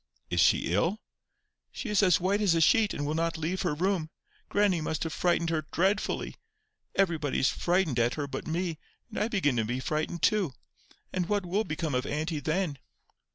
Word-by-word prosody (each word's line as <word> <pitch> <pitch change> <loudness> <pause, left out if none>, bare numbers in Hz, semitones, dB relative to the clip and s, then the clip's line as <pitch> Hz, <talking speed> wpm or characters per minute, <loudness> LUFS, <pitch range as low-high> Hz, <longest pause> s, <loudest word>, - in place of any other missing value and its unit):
"Is - - +1
she 85 - +3
ill?" 170 - +1 0.7
"She - - -6
is 210 -1 +3
as 185 -3 +4
white 195 +4 +1
as 190 -5 +3
a - - +3
sheet, 215 +5 +4
and 145 - -3
will 150 - -1
not 165 +1 0
leave 165 +4 -2
her 170 -5 0
room. 175 -1 0 0.4
Grannie 200 -5 +2
must 155 -1 -2
have 160 - -3
frightened 170 -2 +1
her 155 -2 -1
dreadfully. 195 +4 0 0.6
Everybody 165 -7 +1
is 130 - +3
frightened 175 -8 +1
at 120 +1 +2
her 145 - -2
but 140 - -6
me, 165 0 -2 0.3
and - - -3
I 210 - +1
begin 185 - +1
to 115 - +2
be 120 +4 -2
frightened 155 +4 -2
too. 205 - +2 0.6
And 180 -1 -1
what 205 -2 +1
will 200 +5 0
become 155 -1 -3
of 125 +1 0
auntie 155 +1 -2
then?" 155 -1 -1
165 Hz, 195 wpm, -29 LUFS, 150-190 Hz, 0.7 s, as